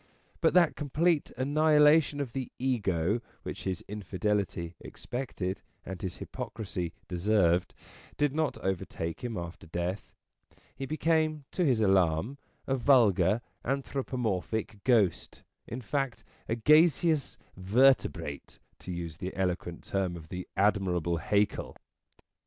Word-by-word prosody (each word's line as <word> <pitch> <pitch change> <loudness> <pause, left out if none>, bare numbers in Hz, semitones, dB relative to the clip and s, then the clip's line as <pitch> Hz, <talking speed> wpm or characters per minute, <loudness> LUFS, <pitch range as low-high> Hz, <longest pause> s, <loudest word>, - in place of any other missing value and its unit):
But - - +3
that 175 -3 +5
complete 155 +2 +1
annihilation 150 +2 +4
of 130 -5 -3
the 130 -2 -4
Ego, 105 -5 0 0.2
which - - -6
his 95 -2 -3
infidelity 100 -3 -2
expected 110 -7 -5 0.2
and 95 -1 -6
his 90 -2 -3
hypocrisy 95 -6 -5 0.2
deserved, 90 -1 +2 0.4
did 145 -2 +2
not 155 -2 0
overtake 85 -2 -3
him 120 -3 -3
after 85 -1 -7
death. 85 +4 -3 0.6
He 135 0 -5
became, 155 -1 +1
to 180 - 0
his 125 -8 +3
alarm, 95 - +2 0.3
a 135 - +1
vulgar, 120 -4 +4 0.2
anthropomorphic 115 -6 -2
ghost, 110 -9 +2 0.2
in 120 +3 -5
fact, 135 +1 -2 0.3
a 115 - +1
gaseous 155 +3 +4 0.2
vertebrate, 95 - +2 0.2
to 90 - -7
use 85 -3 -5
the 95 +1 -5
eloquent 90 -2 -2
term 95 -3 -1
of 80 -2 -10
the 90 0 -6
admirable 95 -4 +2
Haeckel. 100 +5 0
105 Hz, 120 wpm, -30 LUFS, 90-135 Hz, 0.6 s, that